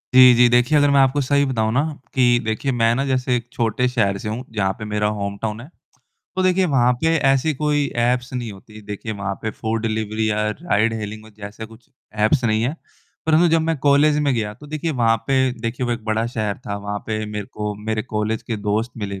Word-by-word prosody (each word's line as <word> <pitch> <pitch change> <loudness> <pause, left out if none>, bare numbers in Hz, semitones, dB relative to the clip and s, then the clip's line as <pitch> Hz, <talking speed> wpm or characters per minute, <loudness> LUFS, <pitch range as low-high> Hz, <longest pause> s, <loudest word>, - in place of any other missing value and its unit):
जी, 130 -1 +9
जी। 120 +1 +6
देखिए 125 +5 +3
अगर 145 0 +4
मैं 140 - +4
आपको 135 +2 +3
सही 140 +1 +2
बताऊँ 110 -5 0
न 130 - +3 0.3
कि 120 -2 +4
देखिए 110 +5 -1
मैं 115 -2 +2
न 135 - 0
जैसे 130 -1 +1
एक 120 - -7
छोटे 120 +2 0
शहर 105 -6 +1
से 105 - -5
हूँ, 115 +4 -4
जहाँ 95 -3 0
पे 110 - -5
मेरा 105 0 0
होमटाउन 100 +2 -4
है। 130 - -11 0.7
तो 185 - +1
देखिए 185 0 +3
वहाँ 125 -5 +3
पे 165 0 +2 0.2
ऐसी 135 +4 +2
कोई 145 0 +1 0.2
ऐप्स 125 +1 0
नहीं 120 -3 -4
होतीं, 105 +2 -14
देखिए 105 +2 -5
वहाँ 100 -1 -3
पे 110 - -2
फूड 110 +1 -3
डिलिवरी 110 -1 -1
या 105 0 0
राइड-हेलिंग 110 - -1
हो 110 - -14
जैसे 105 +2 -8
कुछ 115 +4 -18 0.4
ऐप्स 130 +2 +2
नहीं 110 -1 +2
हैं। 130 +6 -1 0.5
परंतु 160 +2 +4
जब 165 0 +3
मैं 165 -1 0
कॉलेज 145 +2 +4
में 145 -2 +2
गया, 105 -2 -2
तो 145 - -14
देखिए 155 +2 -3
वहाँ 115 -3 +3
पे 130 -1 +2
देखिए 120 +2 -2
वो 120 - 0
एक 115 -2 -5
बड़ा 110 +1 0
शहर 110 -4 -3
था। 100 0 -3
वहाँ 100 0 -4
पे 110 -1 -2
मेरे 105 -1 -5
को 105 0 -3
मेरे 110 0 -1
कॉलेज 110 +1 -2
के 115 - -4
दोस्त 105 +4 -1
मिले, 100 -3 -5
115 Hz, 220 wpm, -21 LUFS, 110-135 Hz, 0.7 s, जी